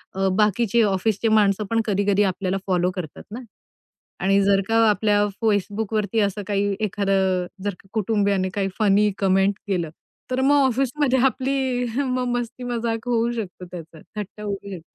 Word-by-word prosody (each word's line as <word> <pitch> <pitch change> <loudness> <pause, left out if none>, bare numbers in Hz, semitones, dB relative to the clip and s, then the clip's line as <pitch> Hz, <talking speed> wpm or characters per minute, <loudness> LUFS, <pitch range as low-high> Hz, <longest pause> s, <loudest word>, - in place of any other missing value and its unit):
अ, 195 0 +1
बाकीचे 215 +2 +2
ऑफिसचे 205 +2 0
माणसं 210 -1 +3
पण 225 0 +2
कधी-कधी 205 0 +2
आपल्याला 190 0 -1
फॉलो 180 0 +1
करतात 165 -5 -7
ना 230 - -6 0.8
आणि 195 +1 +3
जर 195 0 +3
का 225 - 0
आपल्या 205 0 +2 0.2
Facebookवरती 210 +1 0
असं 200 0 -1
काही 200 0 0
एखादं 195 -3 +1 0.2
जर 205 -1 -1 0.2
कुटुंबियाने 200 -3 +1
काही 195 -1 0
फनी 205 0 +3
कमेंट 195 0 +2
केलं, 175 -5 -1 0.4
तर 255 +1 0
मग 285 +2 +4
ऑफिसमध्ये 265 +1 +1
आपली 260 -1 0 0.2
मग 255 0 -1
मस्ती-मजाक 235 -1 -3
होऊ 235 0 +1
शकते, 190 -5 -6
त्याचा 165 -2 -10 0.2
थट्टा 210 +1 -6
होऊ 200 -1 -2 0.2
शकते. 175 -4 -7
205 Hz, 145 wpm, -23 LUFS, 195-230 Hz, 0.8 s, मग